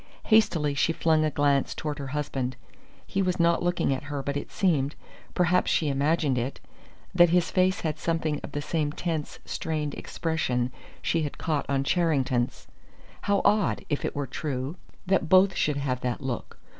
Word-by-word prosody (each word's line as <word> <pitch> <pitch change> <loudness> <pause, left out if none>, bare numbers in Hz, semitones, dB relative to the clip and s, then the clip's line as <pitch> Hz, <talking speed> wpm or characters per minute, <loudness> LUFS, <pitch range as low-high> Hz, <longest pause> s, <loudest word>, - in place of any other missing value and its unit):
Hastily 195 -10 +3
she 160 +3 +2
flung 160 -1 +2
a 155 - +2
glance 145 -1 +1
toward 150 -1 -4
her 140 - -4
husband. 135 -3 -2 0.5
He 195 - -1
was 180 -2 0
not 170 0 +3
looking 175 -5 +1
at 135 +2 -5
her, 145 -1 -4
but 140 +1 -2
it 145 - -4
seemed 150 -7 +1 0.4
perhaps 180 +1 +3
she 155 - +2
imagined 140 -1 +1
it 130 +3 -3 0.5
that 175 -1 +6
his 175 0 +2
face 185 0 +2
had 155 -1 -2
something 160 -3 -1
of 145 - -8
the 145 - -3
same 150 -2 -1
tense, 160 -1 -3
strained 150 -2 -2
expression 130 -7 -1 0.3
she 165 - +1
had 145 -2 -4
caught 155 -3 -2
on 135 -1 +1
Charrington's. 135 -7 +1 0.6
How 200 -1 +1
odd, 210 0 +2
if 145 - -1
it - - -2
were 145 -1 -1
true, 135 +1 -4 0.3
that 185 -3 +1
both 185 +1 +6
should 150 -2 +1
have 130 -3 -1
that 125 -1 -2
look. 130 -4 -5
150 Hz, 175 wpm, -27 LUFS, 140-170 Hz, 0.6 s, that